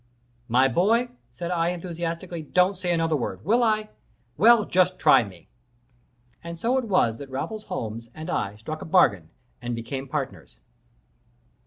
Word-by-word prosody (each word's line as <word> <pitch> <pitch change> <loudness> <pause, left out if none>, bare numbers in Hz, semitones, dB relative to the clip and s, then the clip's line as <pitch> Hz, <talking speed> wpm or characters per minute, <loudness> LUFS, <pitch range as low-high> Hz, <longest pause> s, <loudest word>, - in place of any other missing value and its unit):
"My 125 +3 +4
boy," 220 - +2 0.2
said 170 +9 -5
I, 170 -1 +1
enthusiastically, 170 -1 -4
"don't 180 +5 +2
say 180 -1 -2
another 165 -2 +1
word. 100 -8 -4
Will 235 +3 +3
I? 215 -1 +1 0.5
Well, 225 - +6
just 185 0 +2
try 150 -8 +5
me!" 95 -5 -13 1.0
And 170 0 -7
so 240 +6 +1
it 255 - -4
was 150 - +2
that 140 - -8
Raffles 210 +12 -5
Holmes 115 - -5
and 155 +1 -7
I 100 - -2
struck 155 +9 -7
a - - -6
bargain 100 - +3 0.3
and 120 -1 -3
became 130 +4 -5
partners. 135 -1 -5
165 Hz, 155 wpm, -25 LUFS, 125-185 Hz, 1.0 s, Well